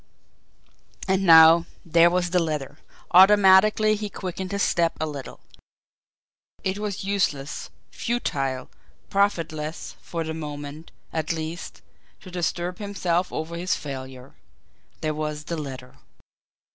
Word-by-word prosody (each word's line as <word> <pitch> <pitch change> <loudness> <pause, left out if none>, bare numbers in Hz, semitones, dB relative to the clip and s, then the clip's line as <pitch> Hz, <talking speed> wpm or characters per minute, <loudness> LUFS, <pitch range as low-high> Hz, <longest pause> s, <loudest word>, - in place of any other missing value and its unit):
And 190 0 +1
now 165 +1 +8 0.2
there 170 +1 +5
was 175 0 0
the 180 -1 +3
letter! 150 -3 -4 0.3
Automatically 205 +3 +6
he 210 0 -4
quickened 185 -1 -6
his 200 -1 0
steps 170 -1 +1
a 160 - 0
little. 145 -3 -7 1.2
It 190 +1 -2
was 205 -2 -4
useless, 165 -8 -2 0.2
futile, 135 - -2 0.4
profitless, 165 -6 -1
for 165 -1 -4
the 160 0 -4
moment, 150 0 -7 0.2
at 160 0 -1
least, 160 +1 -6 0.4
to 185 - -12
disturb 175 0 -2
himself 185 -4 -1
over 160 +2 -4
his 180 +2 0
failure 130 -2 -8 0.7
there 155 0 -1
was 150 0 -4
the 170 +2 -4
letter! 130 -4 -8
170 Hz, 120 wpm, -24 LUFS, 150-190 Hz, 1.2 s, now